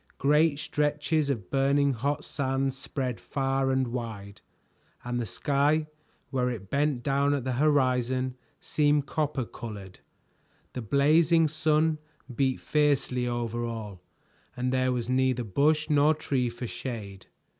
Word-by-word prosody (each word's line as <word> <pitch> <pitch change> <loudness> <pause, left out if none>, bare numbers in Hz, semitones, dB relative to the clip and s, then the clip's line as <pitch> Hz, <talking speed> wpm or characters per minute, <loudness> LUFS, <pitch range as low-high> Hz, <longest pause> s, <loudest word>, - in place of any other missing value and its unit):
Great 150 +2 +3
stretches 150 0 0
of 115 -9 -3
burning 140 +1 +3
hot 140 +5 -2
sands 135 -1 -1
spread 130 -3 -4
far 135 -1 -1
and 130 -2 +1
wide, 110 -5 -6 0.6
and 120 0 -2
the 115 - -3
sky, 145 +9 +1 0.5
where 125 -2 +1
it 100 -6 -6
bent 140 -3 +1
down 140 0 +2
at 135 - -3
the 130 - -2
horizon, 130 -2 +1 0.3
seemed 145 -1 +1
copper 150 -5 -1
colored. 105 -6 -9 0.7
The 125 - -4
blazing 155 +7 +4
sun 155 +1 +1 0.4
beat 130 -1 +1
fiercely 140 -4 +1
over 120 -1 -2
all, 110 -5 -6 0.6
and 125 +1 -1
there 130 0 +2
was 120 -2 -2
neither 130 -1 +1
bush 150 +8 +2
nor 150 0 +4
tree 130 -5 -1
for 120 +1 -7
shade. 105 -6 -6
135 Hz, 135 wpm, -28 LUFS, 120-145 Hz, 0.7 s, blazing